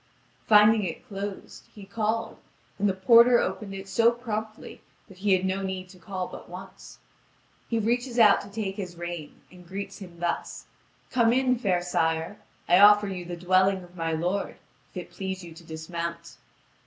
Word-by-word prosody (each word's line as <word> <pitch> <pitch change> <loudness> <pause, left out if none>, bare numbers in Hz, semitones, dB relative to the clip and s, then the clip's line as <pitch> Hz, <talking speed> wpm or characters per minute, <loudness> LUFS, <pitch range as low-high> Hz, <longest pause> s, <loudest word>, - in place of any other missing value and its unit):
Finding 210 0 +6
it 175 +6 -5
closed, 200 -2 -7
he 205 -2 -10
called, 220 +2 -2 0.4
and 205 0 +2
the - - +1
porter 235 +5 +6
opened 195 0 -3
it 195 0 -8
so 230 +3 +4
promptly 220 -2 -6 0.3
that 190 -4 -16
he 200 0 +2
had 185 0 +2
no 190 +1 -1
need 190 -1 -4
to 185 - -15
call 185 +1 -4
but - - -11
once. 185 +2 -11 0.7
He 230 - 0
reaches 240 +3 -1
out 215 -4 +6
to 200 - -11
take 200 -2 -4
his 180 -4 -6
rein, 170 -2 -7
and 180 -1 -15
greets 195 +4 -6
him 175 -4 -11
thus: 175 0 -3 0.5
"Come 235 -2 +3
in, 255 0 +2
fair 185 -6 +1
sire. 165 +2 -1 0.3
I 175 +1 +5
offer 205 0 +7
you 185 -2 -5
the 175 0 -6
dwelling 185 +2 +2
of 175 0 -16
my 165 -2 -2
lord, 175 +5 -2 0.3
if - - -12
it - - -7
please 190 -1 -5
you 170 -1 -10
to 165 +1 -14
dismount." 170 +1 -6
195 Hz, 180 wpm, -26 LUFS, 175-215 Hz, 0.7 s, offer